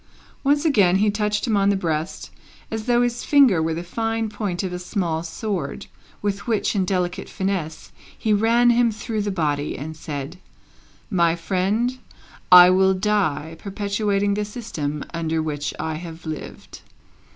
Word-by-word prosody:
Once 290 +2 +2
again 200 - +4
he 205 +2 +3
touched 210 0 -1
him 225 -4 +1
on 200 0 +3
the 200 - +3
breast, 160 -3 -3 0.4
as 220 -1 -4
though 240 0 +4
his 240 0 -1
finger 265 - +5
were 160 0 0
the 170 - -4
fine 225 +4 -2
point 205 -4 -3
of 185 -1 -3
a 180 - -4
small 180 -3 -2
sword, 170 -2 -4 0.4
with 200 +2 -2
which, 225 -2 0
in 190 -2 +1
delicate 180 -1 -2
finesse, 190 -5 -3 0.3
he 215 - +1
ran 230 +3 +4
him 235 -1 +3
through 215 +1 -3
the 205 - -2
body, 150 -6 -1
and 160 +3 -6
said, 150 +2 -6 0.7
"My 170 -3 +3
friend, 200 +9 -1 0.5
I 180 0 +10
will 190 +1 +4
die, 185 -6 0
perpetuating 200 0 -1
the 210 +1 -1
system 165 - -4
under 165 -1 -1
which 145 -2 -2
I 160 0 -2
have 165 0 -9
lived." 155 -1 -8
190 Hz, 160 wpm, -22 LUFS, 165-215 Hz, 0.7 s, I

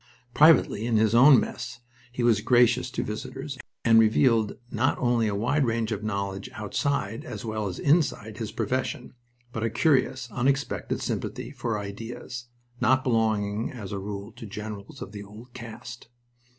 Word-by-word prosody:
Privately, 150 -8 +5
in 115 -2 +2
his 110 0 +3
own 130 +3 +8
mess, - - -5 0.3
he 125 0 -3
was 115 -3 +4
gracious 120 +1 +4
to - - -3
visitors, 135 +5 -6 0.3
and 115 -1 +7
revealed 110 0 +3
not 120 +3 +1
only 120 -2 +2
a 100 - -1
wide 130 +8 +1
range 115 -2 0
of 105 -2 -2
knowledge 100 -2 -3
outside 115 0 -2
as 110 -3 -7
well 110 -2 -2
as 90 - -5
inside 140 -8 +1
his 110 -2 -4
profession, 125 +2 -2 0.4
but 110 - -4
a 115 - +1
curious, 130 0 +2
unexpected 135 +2 -1
sympathy - - -3
for 115 -3 -2
ideas, 115 +4 -7 0.3
not 130 0 +3
belonging 110 -3 +1
as 110 -6 -8
a 100 - -3
rule 100 +2 -6
to 115 0 -10
generals 105 0 -7
of 95 - -10
the 100 -1 -7
old 110 +5 -13
caste. 120 0 -9
115 Hz, 160 wpm, -26 LUFS, 105-125 Hz, 0.4 s, own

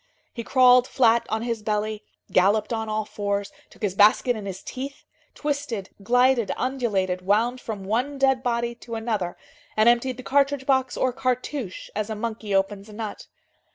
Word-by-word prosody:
He 235 - -5
crawled 250 0 +5
flat 235 -2 +3
on 220 +1 -1
his 230 -2 -2
belly, 215 0 -2 0.3
galloped 205 +4 +3
on 220 -1 -2
all 215 0 -1
fours, 200 -1 -3 0.2
took - - -17
his 200 -3 0
basket 210 +5 +4
in 210 -2 -6
his 190 -1 -6
teeth, 275 +2 -7 0.3
twisted, 280 -9 -3
glided, 245 +1 +3
undulated, 205 -9 -1
wound 225 +7 +1
from 210 -4 -5
one 245 +8 -1
dead 265 -1 +3
body 235 -1 -1
to 230 - -6
another, 220 -6 -2 0.4
and 215 +1 +5
emptied 240 +1 +3
the 255 - -8
cartridge 280 0 +1
box 265 -2 +1
or 255 -1 +1
cartouche 255 -4 -3
as 215 +1 -2
a 220 - -3
monkey 220 -1 -4
opens 195 +1 0
a - - -11
nut. 215 -1 -6
230 Hz, 170 wpm, -24 LUFS, 210-255 Hz, 0.4 s, crawled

